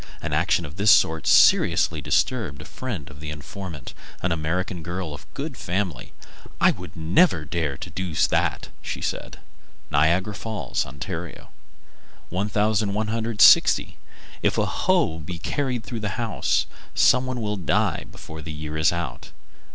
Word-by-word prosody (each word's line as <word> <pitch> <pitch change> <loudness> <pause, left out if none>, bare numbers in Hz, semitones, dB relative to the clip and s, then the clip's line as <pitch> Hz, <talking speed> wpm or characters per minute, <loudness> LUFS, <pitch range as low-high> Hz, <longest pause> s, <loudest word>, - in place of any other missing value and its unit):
An - - -4
action 85 - +2
of 75 +4 -10
this 100 +2 +3
sort 80 -5 +4
seriously 80 -2 +5
disturbed 90 - 0
a 75 - -9
friend 110 - -6
of 75 - -13
the 75 0 -6
informant, 75 0 -7 0.3
an 90 - +1
American 85 +2 -2
girl 85 -1 -4
of 70 - -12
good 140 0 -4
family. 90 - -3 0.5
"I - - +6
would 90 -4 -9
never 85 - +3
dare 75 -2 -2
to - - -8
do 90 -3 -4
that," - - +1
she - - -5
said. - - -4 0.5
Niagara 85 +8 +2
Falls, 105 - -3
Ont. 70 +8 -8
1160. 105 +5 +1 0.4
If - - +1
a - - +2
hoe 80 0 +1
be 85 +3 -6
carried 125 +4 -2
through 115 -2 -5
a 105 - -2
house, 115 +2 0 0.3
some 130 0 +4
one 130 -1 -3
will 105 -2 -2
die 90 -6 0
before 80 0 -10
the 80 0 -7
year 75 0 -5
is 80 - +4
out. 85 -2 -5
90 Hz, 145 wpm, -24 LUFS, 80-105 Hz, 0.5 s, I